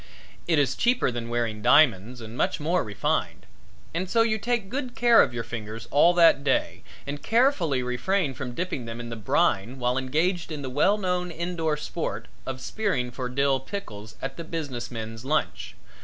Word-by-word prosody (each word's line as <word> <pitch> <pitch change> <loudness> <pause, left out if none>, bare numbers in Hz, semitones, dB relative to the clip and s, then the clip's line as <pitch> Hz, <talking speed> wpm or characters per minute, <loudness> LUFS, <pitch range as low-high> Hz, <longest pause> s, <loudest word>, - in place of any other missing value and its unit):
It 165 -2 +3
is 135 -3 +2
cheaper 240 - +2
than 120 -1 -5
wearing 115 -3 -1
diamonds 120 -3 +4
and 110 +1 -8
much - - 0
more 170 +4 +1
refined, 105 -1 -2 0.5
and 180 +3 -2
so 230 +2 +4
you 220 -1 0
take 235 -2 -1
good 255 +2 -4
care 240 -1 +6
of - - +2
your 120 -1 -4
fingers 115 0 -7
all 170 +5 +5
that 165 -5 +6
day 135 -2 0 0.2
and 145 +1 -5
carefully 205 - +2
refrain 135 +6 0
from 125 0 -6
dipping 170 -7 -3
them 115 0 -6
in 120 0 -6
the 115 - -5
brine 110 +2 +1
while 125 +1 0
engaged 160 +6 0
in 150 -2 -5
the 130 - -5
well 185 +10 +3
known 180 -2 -1
indoor 165 -2 -2
sport 155 +2 -4 0.2
of 130 -1 -4
spearing 155 - -1
for 125 0 -4
dill 135 +1 +2
pickles 110 - -7
at 135 0 -4
the 170 - -5
business 145 -7 -5
men's 115 -1 -6
lunch. 150 +4 -1
140 Hz, 185 wpm, -26 LUFS, 120-180 Hz, 0.5 s, care